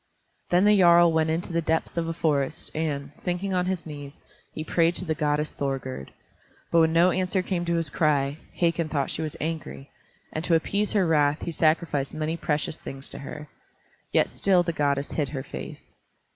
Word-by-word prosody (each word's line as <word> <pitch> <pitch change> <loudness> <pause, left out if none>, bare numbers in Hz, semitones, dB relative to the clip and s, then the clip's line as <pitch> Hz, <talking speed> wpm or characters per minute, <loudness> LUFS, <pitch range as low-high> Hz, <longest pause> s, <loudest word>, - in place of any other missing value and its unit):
Then 180 +3 +4
the 210 0 +6
jarl 175 -3 +6
went 160 0 +2
into 165 +2 -2
the 170 - +2
depths 160 0 -1
of 170 -1 -1
a 165 - -2
forest, 145 -5 -1
and, 145 -3 -3
sinking 180 +4 -3
on 180 0 +1
his 185 -2 -2
knees, 145 -2 -9 0.3
he 155 - -5
prayed 170 +2 +2
to 185 - -3
the 160 - 0
goddess 150 0 0
Thorgerd. 135 - -4 0.6
But 170 - +5
when 160 0 +4
no 170 +2 +5
answer 185 0 0
came 180 -2 -2
to 170 0 0
his 165 -4 -1
cry, 145 -2 +1 0.2
Hakon 170 -2 +1
thought 140 -3 -1
she - - -3
was 155 -2 -3
angry, 150 - -5 0.4
and 155 - -3
to 170 - +3
appease 200 +6 0
her 200 -3 +3
wrath 150 -2 +2
he 170 - -3
sacrificed 155 -3 +1
many 155 +1 -1
precious 150 -1 -2
things 135 0 -4
to - - -6
her. 150 +2 -8 0.6
Yet - - +3
still 185 -3 +3
the 170 -1 -2
goddess 140 -2 0
hid 145 -4 -1
her 135 -2 -4
face. 65 - -9
160 Hz, 195 wpm, -26 LUFS, 145-170 Hz, 0.6 s, the